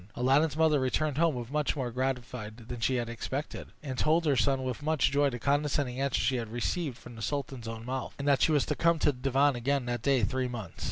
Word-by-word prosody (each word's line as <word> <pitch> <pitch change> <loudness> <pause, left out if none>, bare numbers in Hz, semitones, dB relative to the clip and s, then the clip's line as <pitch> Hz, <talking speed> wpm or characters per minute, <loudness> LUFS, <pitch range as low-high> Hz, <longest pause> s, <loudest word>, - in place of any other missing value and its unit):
Aladdin's 140 +5 +2
mother 160 -2 +4
returned 140 +3 0
home 150 -8 +1
much 150 0 0
more 130 -4 -2
gratified 125 -3 -3
than 120 - -5
she 130 +3 +1
had 120 -2 -1
expected, 130 +5 -5 0.2
and 130 -3 -4
told 165 +2 +3
her 145 -3 +3
son 135 +2 +2
with 130 +1 -3
much 155 -2 +2
joy 140 0 +3
the 120 - -5
condescending 140 -1 0
answer 140 -2 +1
she 130 - +1
had 115 -2 -4
received 125 +3 -2
from 120 -2 -12
the 115 - -9
sultan's 135 -2 -3
own 115 0 -6
mouth; 130 +1 -4
and 140 - -4
that 140 -4 +4
she - - +4
was 145 -3 +3
to - - -1
come 170 0 +3
to 150 - +3
the 125 - -13
divan 135 +1 +3
again 135 +2 0
that 120 -1 -2
day 135 -2 +2
three 130 +4 0
months. 115 -7 -7
130 Hz, 235 wpm, -30 LUFS, 120-145 Hz, 0.2 s, mother